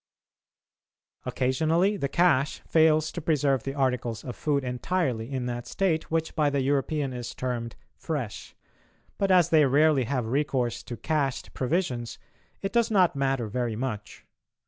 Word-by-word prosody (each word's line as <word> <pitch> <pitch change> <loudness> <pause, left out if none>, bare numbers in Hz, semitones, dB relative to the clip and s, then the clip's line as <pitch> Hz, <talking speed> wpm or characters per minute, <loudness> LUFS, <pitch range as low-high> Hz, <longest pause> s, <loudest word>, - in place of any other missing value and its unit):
Occasionally 160 +10 +1
the 140 -8 -2
"cache" 155 -5 +2
fails 155 -1 +3
to 170 - -5
preserve 145 -4 +1
the 135 +3 -5
articles 125 -5 -1
of 125 - -6
food 145 -2 0
entirely 125 -2 -2
in 130 -2 -2
that 120 0 -4
state 175 -5 0
which 160 0 -1
by 150 -2 +3
the 140 -1 0
European 140 0 0
is 120 -1 -6
termed 120 -2 -3 0.2
"fresh"; 140 -10 -5 0.6
but 195 - +1
as 180 -3 +5
they 155 -2 +5
rarely 145 -1 +4
have 125 -2 -1
recourse 125 -2 -1
to 120 - -6
"cached" 140 +1 -2
provisions, 125 -6 -2 0.5
it 195 - -2
does 235 -1 +3
not 185 -6 +3
matter 135 -4 0
very 120 +1 -2
much. 110 -3 -5
135 Hz, 145 wpm, -27 LUFS, 125-160 Hz, 0.6 s, as